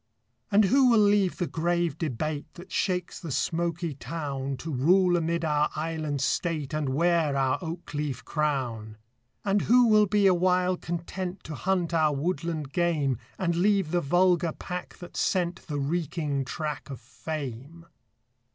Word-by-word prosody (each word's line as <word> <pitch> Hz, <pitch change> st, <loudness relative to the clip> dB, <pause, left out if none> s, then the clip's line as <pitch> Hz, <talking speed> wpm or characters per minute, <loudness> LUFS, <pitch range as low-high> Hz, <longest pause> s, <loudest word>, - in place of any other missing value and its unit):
And 205 Hz, +1 st, +5 dB
who 260 Hz, +5 st, +5 dB
will 235 Hz, -, +5 dB
leave 205 Hz, -3 st, +3 dB
the 175 Hz, -, 0 dB
grave 170 Hz, +1 st, 0 dB
debate 150 Hz, 0 st, -3 dB
That 185 Hz, +2 st, -12 dB
shakes 180 Hz, -2 st, -1 dB
the 165 Hz, -, -6 dB
smoky 170 Hz, +3 st, -1 dB
town, 140 Hz, -1 st, -4 dB
To 160 Hz, +3 st, -5 dB
rule 175 Hz, +7 st, +4 dB
amid 170 Hz, 0 st, 0 dB
our 150 Hz, -1 st, +2 dB
island 155 Hz, -3 st, -2 dB
state, 155 Hz, +1 st, -1 dB
And 155 Hz, -3 st, -1 dB
wear 160 Hz, 0 st, +2 dB
our 135 Hz, +1 st, +1 dB
oak 170 Hz, -2 st, -6 dB
leaf 145 Hz, -4 st, -3 dB
crown? 125 Hz, -8 st, -2 dB, 0.5 s
And 200 Hz, 0 st, +2 dB
who 245 Hz, +1 st, +7 dB
will 215 Hz, -1 st, +5 dB
be 205 Hz, +1 st, +2 dB
awhile 180 Hz, 0 st, +3 dB
content 175 Hz, +2 st, -5 dB
To 155 Hz, -, -7 dB
hunt 180 Hz, +1 st, -1 dB
our 155 Hz, -3 st, +3 dB
woodland 160 Hz, -2 st, -2 dB
game, 155 Hz, -8 st, +1 dB, 0.2 s
And 170 Hz, -2 st, 0 dB
leave 195 Hz, -3 st, +2 dB
the 175 Hz, 0 st, +2 dB
vulgar 175 Hz, +1 st, +2 dB
pack 180 Hz, 0 st, -6 dB
that 175 Hz, -, -11 dB
scent 175 Hz, -2 st, -1 dB
The 150 Hz, -3 st, -3 dB
reeking 145 Hz, -1 st, -1 dB
track 150 Hz, +1 st, -4 dB
of 135 Hz, -, -6 dB
fame? 145 Hz, +4 st, -7 dB
165 Hz, 150 wpm, -27 LUFS, 145-180 Hz, 0.5 s, who